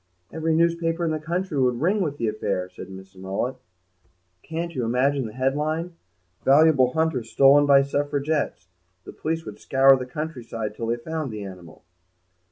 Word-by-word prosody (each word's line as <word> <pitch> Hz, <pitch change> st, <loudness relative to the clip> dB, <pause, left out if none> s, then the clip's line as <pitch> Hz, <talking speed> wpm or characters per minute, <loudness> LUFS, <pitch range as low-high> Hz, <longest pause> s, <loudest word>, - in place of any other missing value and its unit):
"Every 160 Hz, 0 st, 0 dB
newspaper 170 Hz, 0 st, +1 dB
in 160 Hz, -, 0 dB
the 155 Hz, -, -1 dB
country 170 Hz, 0 st, -2 dB
would 125 Hz, -2 st, +2 dB
ring 195 Hz, +7 st, +1 dB
with 150 Hz, -5 st, -2 dB
the 115 Hz, -, -1 dB
affair," 100 Hz, -4 st, -2 dB
said 95 Hz, -, -10 dB
Mrs. 95 Hz, 0 st, -12 dB
Mullet; 95 Hz, +8 st, -3 dB, 0.8 s
"can't 170 Hz, +1 st, -5 dB
you 125 Hz, -, -2 dB
imagine 130 Hz, +2 st, +1 dB
the 105 Hz, -, -10 dB
headline, 150 Hz, +7 st, -1 dB, 0.5 s
'Valuable 140 Hz, -3 st, +5 dB
Hunter 160 Hz, -5 st, +1 dB
Stolen 140 Hz, +5 st, +5 dB
by 140 Hz, -1 st, +6 dB
Suffragettes'? 145 Hz, -, -1 dB, 0.4 s
The -, -, -10 dB
police 165 Hz, +1 st, -3 dB
would -, -, -9 dB
scour 135 Hz, 0 st, +5 dB
the 130 Hz, -1 st, -5 dB
countryside 125 Hz, -7 st, -5 dB
till 115 Hz, +1 st, -5 dB
they 120 Hz, +1 st, 0 dB
found 155 Hz, +3 st, -4 dB
the 105 Hz, -1 st, -6 dB
animal." 90 Hz, -4 st, -11 dB
140 Hz, 165 wpm, -24 LUFS, 120-160 Hz, 0.8 s, by